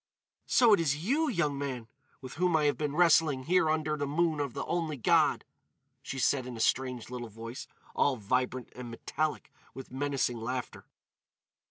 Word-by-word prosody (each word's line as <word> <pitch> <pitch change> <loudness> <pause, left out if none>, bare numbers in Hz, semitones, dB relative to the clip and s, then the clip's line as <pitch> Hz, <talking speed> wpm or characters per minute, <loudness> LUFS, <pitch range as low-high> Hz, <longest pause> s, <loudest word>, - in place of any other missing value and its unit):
"So 235 -3 +5
it 200 - +5
is 155 0 0
you, 300 +7 +2
young 150 - 0
man, 130 -5 -4 0.3
with 130 -1 -8
whom 180 +1 +1
I 155 - +3
have 145 -1 +2
been 150 -1 -3
wrestling 160 -5 +4
here 170 +1 +3
under 155 -1 0
the 145 -1 -3
moon 160 +1 +1
of 140 -4 -3
the - - -3
only 165 -4 -2
God!" 115 - +3 0.6
she 135 - -6
said 130 0 +1
in 125 -2 -7
a - - -8
strange 125 0 0
little 120 -2 -6
voice, 115 +3 -8 0.3
all 140 - +2
vibrant 125 +3 -2
and 125 -1 -7
metallic 150 +6 -3 0.2
with 135 -1 -9
menacing 135 -2 -1
laughter. 125 +3 -5
140 Hz, 175 wpm, -30 LUFS, 125-155 Hz, 0.6 s, So